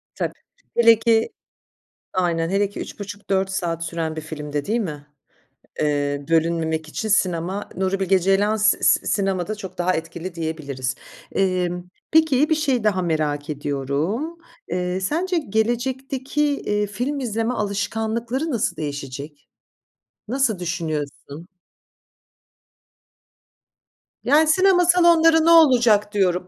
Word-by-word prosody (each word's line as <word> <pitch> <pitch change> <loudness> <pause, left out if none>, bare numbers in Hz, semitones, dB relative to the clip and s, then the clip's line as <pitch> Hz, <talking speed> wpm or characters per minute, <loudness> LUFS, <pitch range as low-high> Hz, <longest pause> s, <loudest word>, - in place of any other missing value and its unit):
Tabii. - - -2 0.5
Hele 230 -2 +6
ki 225 -1 +2 0.8
Aynen, 170 -3 0
hele 200 +1 +1
ki - - -9
3.30-4 200 -1 -3
saat 170 -3 -2
süren 160 -1 -3
bir 155 - -4
filmde, 150 -2 -5
değil 230 +3 0
mi? 150 -8 -5 0.7
Eee, 145 -1 0
bölünmemek 160 -1 +1
için 220 +7 -4
sinema, 185 0 0
Nuri 190 +1 -1
Bilge 190 0 +3
Ceylan 195 +4 +2
s 215 0 +2
s - - +4
sinemada 195 0 0
çok 190 -3 -9
daha 180 +1 +1
etkili 165 +2 -5
diyebiliriz. 150 -6 -3 0.4
Emm, 180 -2 0 0.3
peki, 310 -3 +4
bir 315 - +3
şeyi 270 -7 0
daha 195 -3 +2
merak 155 -3 -1
ediyorum. 150 - -2 0.3
Eee, 180 +1 -1
sence 350 - 0
gelecekteki, 260 +3 -1 0.2
iii, 210 0 -1
film 245 +8 -3
izleme 230 -1 -1
alışkanlıkları 225 +6 -2
nasıl 235 -3 -1
değişecek? 145 0 -6 0.8
Nasıl 240 -4 0
düşünüyorsun? 160 -2 -4 2.8
Yani, 300 +4 +4
sinema 365 +2 +4
salonları 335 -2 +5
ne - - +5
olacak 240 -10 +5
diyorum! 180 -3 +1
195 Hz, 115 wpm, -22 LUFS, 165-235 Hz, 2.8 s, Hele